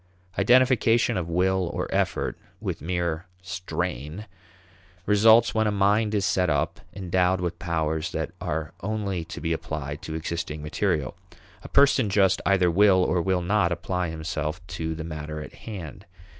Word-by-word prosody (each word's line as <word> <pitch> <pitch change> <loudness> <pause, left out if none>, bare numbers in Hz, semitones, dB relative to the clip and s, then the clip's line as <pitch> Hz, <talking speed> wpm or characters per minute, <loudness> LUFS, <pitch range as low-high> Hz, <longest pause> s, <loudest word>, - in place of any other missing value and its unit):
Identification 120 -2 +4
of 90 -3 -2
will, 90 +1 +1
or - - -2
effort, - - 0 0.2
with - - -4
mere 85 +1 -2 0.2
strain, 90 - -4 0.8
results 110 +3 +5
when 110 -1 +2
a - - +1
mind 105 +2 +2
is 100 -2 +1
set 90 -3 +2
up, 75 -2 0
endowed 90 -1 +1
with 85 -1 -3
powers 80 -3 -1
that - - -3
are 80 0 -3
only 100 -3 -2
to 80 - -8
be 80 0 -1
applied 75 -2 -5
to 80 - -6
existing 80 -2 -4
material. 75 -3 -1 0.5
A - - -10
person 140 -5 +4
just 95 -1 +3
either 95 -3 +4
will 95 0 +5
or 90 -1 +1
will 90 0 0
not 95 -1 +2
apply 85 +1 -2
himself 80 0 -3
to 80 -1 -3
the 80 - -5
matter 75 -1 -5
in 75 - -8
hand. 95 -10 -9
90 Hz, 155 wpm, -25 LUFS, 80-100 Hz, 0.8 s, results